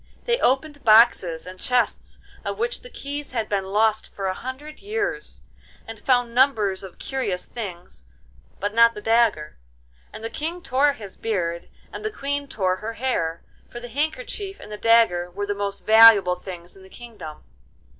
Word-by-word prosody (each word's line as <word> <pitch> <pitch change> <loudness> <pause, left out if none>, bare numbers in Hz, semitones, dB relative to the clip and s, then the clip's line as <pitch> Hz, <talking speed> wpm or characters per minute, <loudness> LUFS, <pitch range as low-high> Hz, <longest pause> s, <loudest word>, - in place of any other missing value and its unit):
They 475 0 +1
opened 285 +3 0
boxes 215 -7 +5
and 185 0 -10
chests 250 +3 0 0.3
of - - -4
which 475 +2 -2
the - - -12
keys 285 - -6
had 225 -3 -1
been 195 -2 -1
lost 215 +2 +1
for 195 - -6
a 190 - 0
hundred 260 +8 -8
years, 415 0 -4 0.5
and 225 -1 -8
found 245 -2 +1
numbers 220 -7 +2
of 190 -2 -11
curious 230 -10 -3
things, 180 - -8 0.5
but 205 +2 -2
not 230 0 +5
the 210 - -7
dagger, 225 - +1 0.5
and - - -10
the 225 - -4
King 330 +6 -4
tore 280 +2 +2
his 205 -8 -10
beard, 170 -6 -3 0.2
and - - -7
the 430 - -1
Queen 285 -6 -3
tore 185 -7 -1
her 225 +3 -5
hair, 195 -10 -2 0.3
for 240 - -8
the 245 0 -9
handkerchief 390 - -3
and - - -11
the - - -4
dagger 210 -6 +3
were 200 +3 -4
the 205 - -1
most 200 0 -4
valuable 220 -5 +7
things 175 -2 -9
in 195 - -16
the 190 - -15
kingdom. 215 -11 -11
225 Hz, 175 wpm, -23 LUFS, 195-275 Hz, 0.5 s, valuable